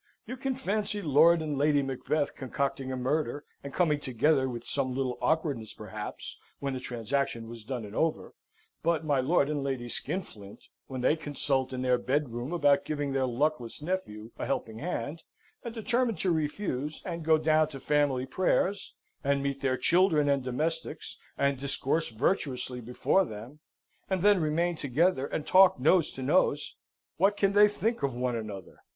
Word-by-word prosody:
You 255 - -5
can 265 0 -2
fancy 210 -4 -1
Lord 160 0 +5
and 150 -3 -2
Lady 145 -1 +3
Macbeth 135 +3 -1
concocting 135 0 -3
a 130 - -3
murder, 145 +3 -1 0.2
and 140 - -6
coming 150 -2 +2
together 130 +1 +2
with 120 -1 -6
some 130 -3 -1
little 130 -2 -2
awkwardness, 145 -9 0
perhaps, 105 0 -7 0.2
when 140 -1 -3
the 130 - -3
transaction 120 -1 -2
was 115 -1 -9
done 120 -1 -4
and 105 +1 -10
over; 160 -1 -1 0.5
but 165 -1 +1
my 145 -3 +2
Lord 140 +1 +3
and 145 -2 -2
Lady 130 -3 -2
Skinflint, 110 - -6 0.2
when 130 -2 -5
they 130 - +3
consult 140 -4 -1
in 130 0 -3
their 125 -1 +3
bedroom 125 0 -1
about 145 -5 +3
giving 145 -2 -2
their 135 -1 +1
luckless 125 -1 -1
nephew 145 - -4
a - - -3
helping 115 -4 -3
hand, 165 -1 -4 0.4
and 235 -2 -6
determine 235 +1 +1
to 185 - 0
refuse, 150 -2 -2
and 170 -3 -4
go 160 0 +5
down 155 0 +3
to 140 -3 -9
family 145 -3 +1
prayers, 190 +5 0 0.3
and 140 0 +1
meet 140 -1 -2
their 130 -1 +1
children 170 -3 +3
and 140 -2 +2
domestics, 155 +5 -3 0.2
and 140 -1 +1
discourse 140 +3 -1
virtuously 125 - -1
before 125 +11 +2
them, 120 - -9 0.5
and 190 -2 0
then 205 -3 +5
remain 165 +3 +1
together, 145 +1 +1
and 150 - -3
talk 185 -5 +6
nose 160 +5 +3
to 130 - -7
nose, 145 0 +2 0.4
what 200 +3 +3
can 195 -1 +2
they 205 +1 +7
think 225 +3 -1
of 135 -3 -1
one 125 0 -1
another? 105 -5 -7
145 Hz, 170 wpm, -29 LUFS, 130-165 Hz, 0.5 s, they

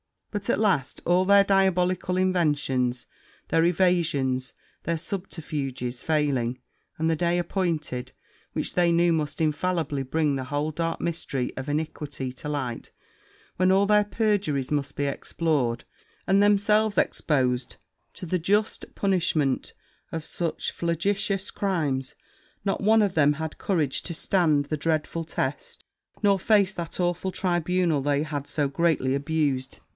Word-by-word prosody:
But, 205 -2 -4
at - - +2
last, 190 - +1
all 180 +2 +3
their 200 +1 +6
diabolical 185 -2 +2
inventions, 145 -9 +1 0.4
their 165 0 +3
evasions, 160 -8 +1 0.3
their 170 0 -1
subterfuges, 150 -9 -4
failing, 140 -6 0 0.4
and 160 - 0
the 160 - +1
day 175 +1 +1
appointed 165 -8 -2 0.4
which - - -2
they 175 -1 +3
knew 170 +1 +4
must 150 -2 -1
infallibly 155 -2 0
bring 145 +1 0
the 130 - -4
whole 145 +3 -1
dark 165 +2 -2
mystery 155 -6 -2
of 130 +1 -5
iniquity 145 -3 -3
to 130 +3 -7
light, 130 -5 -4 0.7
when 185 +1 +4
all 195 +1 +4
their 210 0 +4
perjuries 200 - 0
must 145 -1 -1
be 145 - -1
explored, 140 -4 -1 0.4
and 195 +1 +4
themselves 205 +1 +3
exposed 125 -4 +1 0.4
to - - -8
the 180 +2 0
just 205 +6 0
punishment 170 -8 0 0.4
of 165 -1 -4
such 170 -2 -2
flagitious 195 +3 -1
crimes, 150 -10 -1 0.5
not 195 -1 -1
one 220 +2 +5
of 205 -3 +1
them 145 -2 +4
had 160 +1 -5
courage 155 -9 0
to 170 - -4
stand 160 -4 +2
the 155 +2 -3
dreadful 160 +2 -1
test, 480 - -4 0.4
nor 200 -1 +4
face 200 -1 +3
that 170 0 -4
awful 175 +2 0
tribunal 175 -4 +1
they 145 +1 +1
had 145 -2 -4
so 145 -2 0
greatly 140 -3 +1
abused. 140 -2 -1
165 Hz, 140 wpm, -26 LUFS, 145-185 Hz, 0.7 s, their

